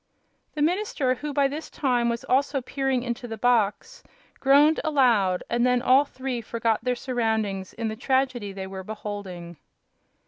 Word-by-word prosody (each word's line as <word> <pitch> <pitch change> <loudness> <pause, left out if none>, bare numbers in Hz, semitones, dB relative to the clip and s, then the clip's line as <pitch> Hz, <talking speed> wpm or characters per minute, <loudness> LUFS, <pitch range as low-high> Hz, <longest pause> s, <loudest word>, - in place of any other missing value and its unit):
The 295 - 0
minister, 330 -6 +1
who 290 +4 -5
by 280 -1 +2
this 300 +3 -6
time 245 -4 0
was 235 0 -3
also 275 +2 +1
peering 265 -1 -1
into 245 0 -4
the 225 -1 -6
box, 245 - +1 0.4
groaned 285 +3 +5
aloud, 235 - +2
and 235 0 0
then 250 0 +2
all 265 +3 +5
three 260 -3 -4
forgot 230 -1 -1
their 250 0 0
surroundings 220 -6 -2
in 230 -1 -3
the 220 - -3
tragedy 255 -3 0
they 190 0 -6
were 190 0 -7
beholding. 190 -5 -7
245 Hz, 160 wpm, -25 LUFS, 220-270 Hz, 0.4 s, groaned